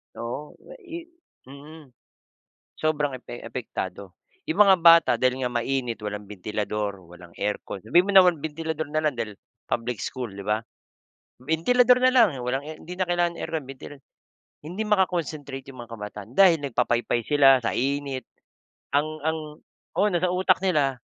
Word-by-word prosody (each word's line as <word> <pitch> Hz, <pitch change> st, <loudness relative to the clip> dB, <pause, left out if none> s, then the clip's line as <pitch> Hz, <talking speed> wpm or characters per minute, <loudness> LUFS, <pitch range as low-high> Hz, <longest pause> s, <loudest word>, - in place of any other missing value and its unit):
Oo. 120 Hz, +6 st, -6 dB, 0.2 s
Ah, -, -, -12 dB
i 340 Hz, -4 st, -8 dB, 0.4 s
mm. 140 Hz, +2 st, -13 dB, 0.9 s
Sobrang 150 Hz, -4 st, 0 dB
epe 120 Hz, -1 st, -10 dB
apektado. 100 Hz, -5 st, -6 dB, 0.3 s
Yung 320 Hz, -9 st, +2 dB
mga 190 Hz, -1 st, +6 dB
bata 165 Hz, 0 st, +7 dB
dahil 130 Hz, +2 st, +1 dB
nga 125 Hz, -, 0 dB
mainit, 120 Hz, 0 st, -1 dB
walang 105 Hz, 0 st, -5 dB
bentilador, 105 Hz, 0 st, -3 dB
walang 85 Hz, -1 st, -14 dB
aircon 100 Hz, -1 st, -3 dB
sabihin 175 Hz, -, +4 dB
mo -, -, +1 dB
naman 180 Hz, -3 st, +7 dB
bentilador 160 Hz, +1 st, -3 dB
na 155 Hz, -, +1 dB
lang 150 Hz, -2 st, +1 dB
dahil 110 Hz, -3 st, -3 dB, 0.4 s
public 120 Hz, 0 st, -2 dB
school, 125 Hz, -3 st, -4 dB
di 100 Hz, 0 st, -9 dB
ba? 105 Hz, +1 st, 0 dB, 0.8 s
Bentilador 245 Hz, -, +4 dB
na 255 Hz, 0 st, +5 dB
lang 235 Hz, -5 st, +6 dB
walang 125 Hz, +2 st, -1 dB
air 155 Hz, +1 st, -8 dB
hindi 175 Hz, -, -8 dB
na 185 Hz, -1 st, 0 dB
kailangan 175 Hz, -1 st, +1 dB
aircon, 160 Hz, -3 st, -3 dB
bentil 135 Hz, +1 st, -9 dB, 0.7 s
hindi 180 Hz, +7 st, -4 dB
maka-concentrate 160 Hz, -9 st, -1 dB
yung 130 Hz, -2 st, -10 dB
mga -, -, -27 dB
kabataan 105 Hz, 0 st, -8 dB
dahil 185 Hz, -4 st, +6 dB
nagpapaypay 120 Hz, -2 st, 0 dB
sila 135 Hz, -3 st, +5 dB
sa -, -, -1 dB
init. 140 Hz, -1 st, -2 dB, 0.7 s
Ang 145 Hz, +2 st, +3 dB, 0.2 s
ang 160 Hz, 0 st, 0 dB, 0.6 s
oo, 205 Hz, -, +4 dB
nasa 175 Hz, +1 st, +1 dB
utak 185 Hz, 0 st, +3 dB
nila 145 Hz, -8 st, +1 dB
140 Hz, 155 wpm, -25 LUFS, 120-170 Hz, 0.9 s, bata